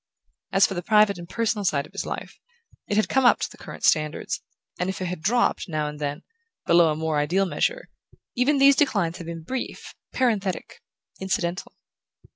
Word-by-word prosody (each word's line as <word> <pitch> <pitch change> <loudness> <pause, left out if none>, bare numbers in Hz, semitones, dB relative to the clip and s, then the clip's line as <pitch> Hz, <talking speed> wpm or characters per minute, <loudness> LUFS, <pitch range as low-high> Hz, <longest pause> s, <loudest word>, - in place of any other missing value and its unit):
As 195 - +5
for - - -2
the 175 - -3
private 210 -1 +3
and 170 0 -10
personal 225 -2 -1
side 140 -6 +1
of - - -17
his - - -5
life, - - -6 0.5
it 205 - -1
had 215 - +3
come 265 - +2
up 245 - +5
to - - -2
the - - -14
current - - -10
standards, 155 -2 +1 0.4
and 180 - -1
if 190 - -4
it 185 - -3
had 180 -2 -4
dropped, 235 0 +1
now 155 -2 -1
and 150 0 -7
then, 145 +1 -3 0.4
below 170 -2 +5
a - - -1
more 160 -1 -1
ideal 175 +7 +1
measure, - - -1 0.5
even 275 +4 +2
these 275 0 +6
declines 200 - +1
had 170 - -8
been 165 -1 -6
brief, 260 +9 -5 0.2
parenthetic, 210 -7 -1 0.4
incidental. 190 -2 -2
190 Hz, 190 wpm, -24 LUFS, 165-225 Hz, 0.5 s, these